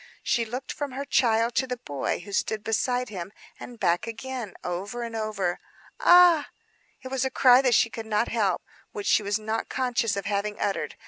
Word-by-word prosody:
She 235 -2 +1
looked 245 +4 -5
from 285 -3 -5
her 275 +2 -4
child 230 -3 +2
to 260 - +1
the 250 -1 -3
boy 145 - -3
who 200 +2 -10
stood 215 +2 -1
beside 245 +3 0
him, 190 -2 -6 0.3
and 240 -2 -10
back 175 +2 +1
again; 240 -1 -6
over 200 +7 -4
and 230 -1 -6
over. 210 -5 -2 0.4
"Ah!" 350 -4 +6 0.5
It 260 - -6
was 265 -1 -1
a 265 - 0
cry 255 -1 +6
that 250 -3 +3
she 230 - +3
could 225 -1 -7
not 215 +2 +1
help; 205 -6 0 0.3
which 205 - -5
she - - +4
was 205 +1 0
not 220 +1 -3
conscious 245 -5 0
of 200 - -4
having 205 +1 -2
uttered. 200 - -2
225 Hz, 195 wpm, -26 LUFS, 205-250 Hz, 0.5 s, Ah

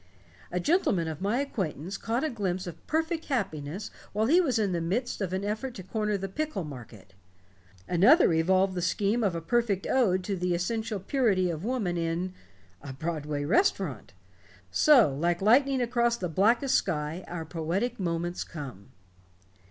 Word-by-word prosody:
A - - -1
gentleman 285 - +2
of 155 0 -5
my 210 +7 +1
acquaintance 190 - -4
caught 230 +6 -2
a 310 - 0
glimpse 190 -5 -2
of 175 - -10
perfect 320 +1 -1
happiness 195 - -3 0.2
while 215 +2 +1
he 335 +9 +5
was 270 -9 +1
in 205 -3 +1
the 170 -1 -1
midst 210 +8 -2
of 190 -3 -2
an 190 +2 -2
effort 230 +5 -3
to 185 - -7
corner 210 +2 -1
the 195 0 -4
pickle 300 - -3
market. 120 - -11 0.7
Another 200 - +5
evolved 185 +4 +3
the 180 - -2
scheme 205 +6 +1
of 190 -5 +1
a 165 - -3
perfect 205 +1 0
ode 190 -8 +2
to 200 +1 -2
the 180 -1 0
essential 220 +4 -2
purity 195 -5 +1
of 160 +1 -5
woman 215 -7 -1
in 170 +2 -2 0.5
a 135 - -7
Broadway 150 -1 -3
restaurant. 365 - +1 0.6
So, 250 - +5
like 170 +5 0
lightning 255 +5 +4
across 235 0 +1
the 180 -5 -3
blackest 230 - +2
sky, 160 0 0
our 165 -2 -5
poetic 180 +9 -2
moments 175 -1 -2
come." 135 - -9
190 Hz, 165 wpm, -28 LUFS, 170-235 Hz, 0.7 s, he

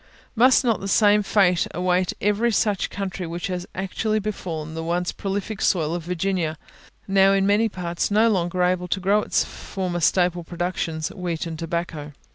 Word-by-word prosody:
Must 255 +4 +5
not 230 -3 +2
the 195 - -5
same 210 +1 +4
fate 190 -4 +2
await 180 +1 +1
every 210 +3 +2
such 210 -2 +1
country 190 -2 -4
which 170 +1 -4
has 180 -1 -4
actually 205 +3 -1
befallen 170 -7 -4
the 160 0 -4
once 175 +2 -1
prolific 200 +1 -4
soil 160 -3 +1
of 170 -2 -4
Virginia, 180 -2 -1 0.5
now 195 0 +5
in 195 0 +2
many 210 +3 +3
parts 175 -3 -3
no 215 +3 +4
longer 180 -4 +1
able 180 0 +1
to 190 - -1
grow 200 +3 +2
its - - +1
former 180 -2 -4
staple 175 0 +2
productions 165 -2 -3
wheat 175 -2 -4
and 160 -1 -6
tobacco? 165 -3 -4
180 Hz, 170 wpm, -23 LUFS, 170-200 Hz, 0.5 s, Must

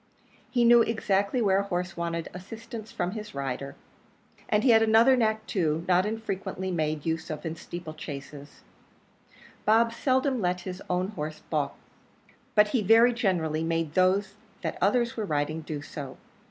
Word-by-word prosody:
He 240 -2 +2
knew 235 0 +7
exactly 220 0 +1
where 195 -2 +3
a - - 0
horse 180 -1 -3
wanted 170 -1 -3
assistance 220 +4 -8
from 175 0 -2
his 210 -3 -7
rider. 135 0 -4 0.7
And 210 0 +2
he 255 - +5
had 225 -1 +6
another 225 +4 +6
knack 220 -2 +1
too, 165 -5 -1
not 185 +2 +3
unfrequently 195 -3 -4
made 155 -3 -1
use 160 0 -2
of 155 +2 -5
in 160 0 -3
steeple 170 -1 -8
chases 145 -1 -9 1.0
Bob 230 +2 +4
seldom 260 0 +1
let 180 -1 0
his 185 +1 -7
own 180 +1 0
horse 155 -6 -6
baulk, - - 0 0.8
but 210 -1 +5
he 240 +1 +1
very 225 +4 +6
generally 165 -8 0
made 165 -2 -1
those 190 +2 +2 0.3
that - - -3
others 235 +4 +2
were 220 - -2
riding 155 -1 -1
do 150 -2 -6
so. 140 -3 -8
185 Hz, 160 wpm, -27 LUFS, 160-220 Hz, 1.0 s, knew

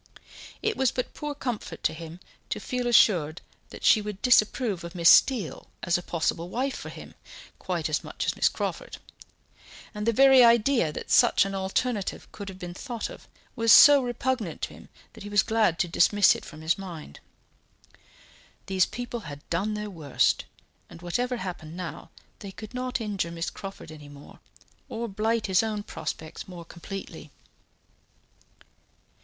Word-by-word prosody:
It 435 0 0
was 265 -2 +3
but 250 - -4
poor 295 -1 -5
comfort 235 - -5
to - - +1
him 165 +2 -10 0.3
to - - -2
feel 250 -1 -3
assured 175 -9 +4 0.3
that - - -11
she 215 - +5
would 210 -2 -6
disapprove 220 -5 +3
of 170 +1 -8
Miss 170 -1 +6
Steele 235 - +3 0.2
as 170 - +1
a 175 - 0
possible 170 0 -2
wife 260 +6 -2
for - - -7
him, - - -11 0.5
quite - - -2
as - - -1
much - - -5
as - - 0
Miss - - +3
Crawford; - - -5 1.0
and 210 0 -4
the - - +5
very 265 +2 +7
idea 235 - +4
that - - -7
such - - +5
an 195 - -4
alternative 195 +3 -2
could 200 -1 -8
have 190 - -10
been 175 -2 -7
thought 235 +4 -5
of - - -13 0.3
was 230 -2 +3
so 290 +3 +9
repugnant 245 -6 -3
to - - -3
him - - -15 0.2
that 225 - -13
he 205 - -7
was 205 -1 +3
glad 220 -7 +2
to 180 - 0
dismiss 195 +4 +4
it - - -9
from 155 0 -11
his 160 +4 0
mind. 170 - -9 1.5
These 190 -2 +2
people 245 -1 -5
had 145 -8 -10
done 200 +6 0
their 210 0 -5
worst, 155 -7 0 0.4
and - - -12
whatever 245 +8 -1
happened 175 -4 -7
now, 180 -2 -7 0.3
they 200 - -8
could 210 +4 -10
not 255 0 -2
injure 200 -6 -2
Miss 170 0 -4
Crawford 195 -5 -9
any 150 -2 -12
more, 145 0 -14 0.5
or 235 +1 -4
blight 220 +2 -1
his 190 -2 +3
own 215 -2 -3
prospects 160 -5 -6
more 175 -2 -10
completely. 170 -2 -9
200 Hz, 170 wpm, -26 LUFS, 170-235 Hz, 1.5 s, so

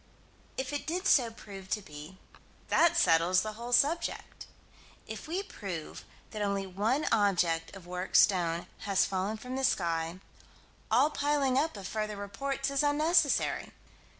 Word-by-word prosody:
If 265 +2 -3
it 290 - -4
did 360 +4 -2
so 245 -5 +4
prove 195 -4 -11
to 215 0 -1
be, 150 +3 -11 0.5
that 340 0 +4
settles 175 - +4
the 215 0 -4
whole 235 +3 -7
subject. 295 +7 0 0.6
If - - -8
we 360 +5 -2
prove 185 - -7 0.3
that 215 - -5
only 200 -1 -1
one 210 +10 0
object 180 -7 +1
of 190 -3 -12
worked 180 +1 -1
stone 175 -4 +3
has 200 -3 +2
fallen 195 +3 -2
from 250 +4 -7
the 265 - -2
sky, 170 -5 0 0.7
all 300 - +4
piling 285 -3 +1
up 290 -2 0
of 195 - -8
further 215 0 -3
reports 275 +7 -3
is 275 0 +1
unnecessary. 300 +1 +2
215 Hz, 150 wpm, -30 LUFS, 185-275 Hz, 0.7 s, so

